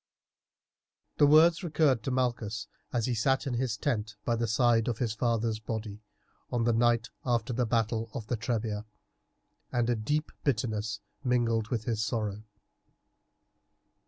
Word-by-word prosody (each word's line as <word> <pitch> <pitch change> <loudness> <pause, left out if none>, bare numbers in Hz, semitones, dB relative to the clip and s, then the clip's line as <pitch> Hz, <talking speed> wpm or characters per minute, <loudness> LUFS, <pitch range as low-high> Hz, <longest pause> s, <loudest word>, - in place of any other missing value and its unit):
The 145 - +6
words 165 +4 +6
recurred 150 -7 +2
to - - 0
Malchus 120 -5 -1 0.3
as 120 -3 0
he 125 - 0
sat 130 +5 +1
in 135 - -2
his 120 -3 -1
tent 105 -1 -2
by 120 - +2
the 115 0 -1
side 115 +1 +3
of 120 -3 -1
his 115 -3 -1
father's 115 -1 0
body 110 -2 -5 0.5
on 120 -2 +1
the 120 0 +3
night 120 0 +2
after 120 0 0
the 125 0 0
battle 115 0 0
of 115 -5 -4
the 120 - -1
Trebia, 110 -2 -2 0.9
and 120 -1 +1
a - - +2
deep 145 +8 -1
bitterness 110 -5 -1 0.2
mingled 115 -3 +1
with 115 -1 -2
his 110 -2 -1
sorrow. 105 -2 -2
115 Hz, 150 wpm, -29 LUFS, 110-125 Hz, 0.9 s, The